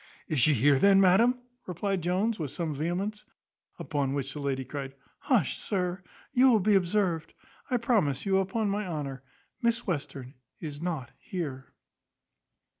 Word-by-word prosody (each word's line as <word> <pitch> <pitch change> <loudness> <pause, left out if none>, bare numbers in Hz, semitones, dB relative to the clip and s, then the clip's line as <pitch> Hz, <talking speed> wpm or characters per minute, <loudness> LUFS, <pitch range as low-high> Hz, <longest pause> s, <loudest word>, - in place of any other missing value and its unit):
"Is 155 -4 0
she 145 +5 +5
here, 135 +3 +4
then, 195 +2 +6
madam?" 205 +7 +5 0.3
replied 185 +1 -2
Jones, 190 +6 0
with 150 -4 -2
some 160 +2 -3
vehemence. 180 +8 -2 0.5
Upon 140 -3 -2
which 135 -1 -3
the 150 - -6
lady 135 -2 -2
cried 135 -1 -6 0.2
"Hush, 225 - +1
sir, 185 -2 -2 0.3
you 260 -1 +5
will 225 -3 +5
be 210 +2 +3
observed. 180 -3 +1 0.3
I 250 - +2
promise 195 - +1
you, 195 -1 +3
upon 200 +3 -1
my 205 0 -1
honour, 140 -6 -4 0.4
Miss 235 0 +1
Western 140 -7 -4 0.3
is 150 -2 -6
not 160 -8 -3
here." 140 -8 -5
175 Hz, 150 wpm, -29 LUFS, 145-200 Hz, 0.5 s, then